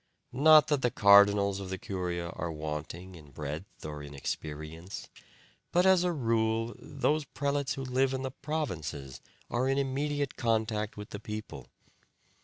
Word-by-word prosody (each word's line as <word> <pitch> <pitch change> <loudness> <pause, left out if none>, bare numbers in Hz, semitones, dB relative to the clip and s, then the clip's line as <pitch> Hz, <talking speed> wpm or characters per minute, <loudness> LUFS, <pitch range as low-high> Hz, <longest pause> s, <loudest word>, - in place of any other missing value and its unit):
Not 155 +3 +7
that 145 -3 +2
the 125 - +3
cardinals 100 -1 +6
of 95 -1 -6
the 95 - -3
curia 90 -4 -3
are 85 -1 -4
wanting 80 +4 -5
in 75 -4 -13
breadth 75 +7 -7
or 75 -1 -5
in 70 0 -9
experience, 80 +6 -6 0.6
but 180 +1 +4
as 190 -2 +6
a 180 - +2
rule 115 -4 0
those 150 +2 0
prelates 140 0 -1
who 135 - -4
live 130 +1 +2
in 130 0 -2
the 130 - -3
provinces 90 - -4 0.3
are 125 +2 +1
in 135 - +2
immediate 140 +1 -1
contact 110 -2 0
with 105 0 -8
the 100 - -5
people. 105 +1 -7
110 Hz, 155 wpm, -30 LUFS, 85-135 Hz, 0.6 s, Not